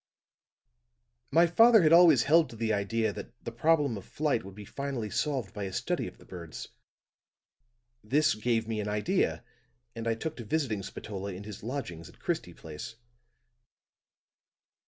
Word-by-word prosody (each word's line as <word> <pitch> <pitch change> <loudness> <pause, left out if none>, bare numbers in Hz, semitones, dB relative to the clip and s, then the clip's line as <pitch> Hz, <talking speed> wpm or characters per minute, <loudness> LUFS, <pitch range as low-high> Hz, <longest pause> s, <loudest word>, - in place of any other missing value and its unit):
My 165 +3 +5
father 225 +4 +6
had 155 +1 +5
always 165 -8 +7
held 160 +4 +4
to - - -10
the 110 -1 0
idea 105 +1 0
that 105 - -9
the 115 - -4
problem 145 -1 +2
of 100 - -8
flight 150 -6 -1
would 95 0 -11
be 105 0 -9
finally 135 -4 -4
solved 130 -9 -1
by 105 -3 -4
a 95 - -5
study - - -2
of - - -11
the - - -18
birds; 85 -3 -8 1.3
this 145 +8 +3
gave 115 0 0
me 110 -1 -2
an 105 - -3
idea, 105 0 0 0.5
and 115 0 -4
I 115 - +1
took 160 +7 -5
to 120 - -6
visiting 115 -4 -1
Spatola 100 0 -6
in 95 +3 -8
his 105 -1 -9
lodgings 100 - -5
in - - -17
Christie - - -3
Place. 80 +7 -8
115 Hz, 160 wpm, -29 LUFS, 105-145 Hz, 1.3 s, always